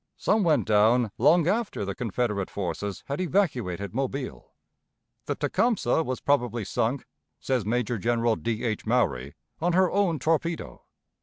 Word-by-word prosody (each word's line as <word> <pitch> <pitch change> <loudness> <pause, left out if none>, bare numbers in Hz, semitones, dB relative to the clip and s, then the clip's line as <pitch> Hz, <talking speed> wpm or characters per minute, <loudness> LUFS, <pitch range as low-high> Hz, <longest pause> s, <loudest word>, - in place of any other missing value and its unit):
Some 215 - +2
went 155 -5 +3
down 110 +2 +3
long 165 +1 +5
after 205 - -1
the 100 - -3
Confederate 105 -2 -2
forces 100 +1 -4
had 140 +5 -3
evacuated 125 - -1
Mobile. 130 - -4 0.8
The - - -1
Tecumseh 230 -8 +1
was 130 -5 -3
probably 120 -6 +1
sunk, 115 +7 -1 0.3
says 130 -6 -1
Major 120 0 0
General 115 +1 +1
D. 115 0 -3
H. 110 -2 -2
Maury, 70 - 0 0.2
on 175 +2 +1
her 185 0 +3
own 195 -5 +2
torpedo. 165 - -1
125 Hz, 140 wpm, -26 LUFS, 105-160 Hz, 0.8 s, long